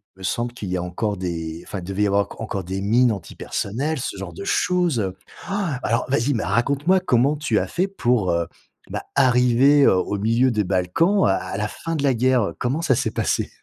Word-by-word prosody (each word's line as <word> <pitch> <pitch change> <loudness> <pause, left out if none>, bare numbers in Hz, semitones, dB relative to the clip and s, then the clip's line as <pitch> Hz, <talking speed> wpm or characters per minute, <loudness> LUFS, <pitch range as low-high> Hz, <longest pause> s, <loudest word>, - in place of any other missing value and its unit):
il 95 - -24
me - - -11
semble 120 +5 -1
qu'il 105 -6 -6
y 90 - -1
a 90 - -3
encore 100 +3 -2
des 85 -2 -4
enfin, 95 0 -6
devait 95 +3 -2
y - - +3
avoir 100 0 +2
enc - - -10
encore 100 -4 -3
des 95 +2 -4
mines 120 +4 +3
antipersonnel, 110 - -3
ce 100 - -4
genre 95 -3 -7
de 85 - -8
choses, 175 - +1
heu. 95 -2 -3 0.3
Ah, 195 -9 -2
alors, 115 +3 0
vas-y, 140 +1 +1
mais 115 - -1
raconte-moi! 140 - +2
comment 140 -4 +2
tu 150 0 0
as - - 0
fait 185 +2 -1
pour, 120 - +1
heu, 85 0 0 0.4
bah, - - -4
arriver, 125 +3 +4
heu, - - +6
au 95 +2 -1
milieu 115 +5 +2
des 105 -2 +1
Balkans, 95 - +2
à 95 -1 +3
à 95 +1 -5
la 105 +1 -1
fin 165 +9 -5
de 145 - -2
la 135 -2 +3
guerre, 125 0 +2
heu, 85 -5 -4
comment 130 +6 -1
ça 155 -6 +2
s'est 115 -3 -1
passé? - - -1
115 Hz, 230 wpm, -22 LUFS, 95-140 Hz, 0.4 s, heu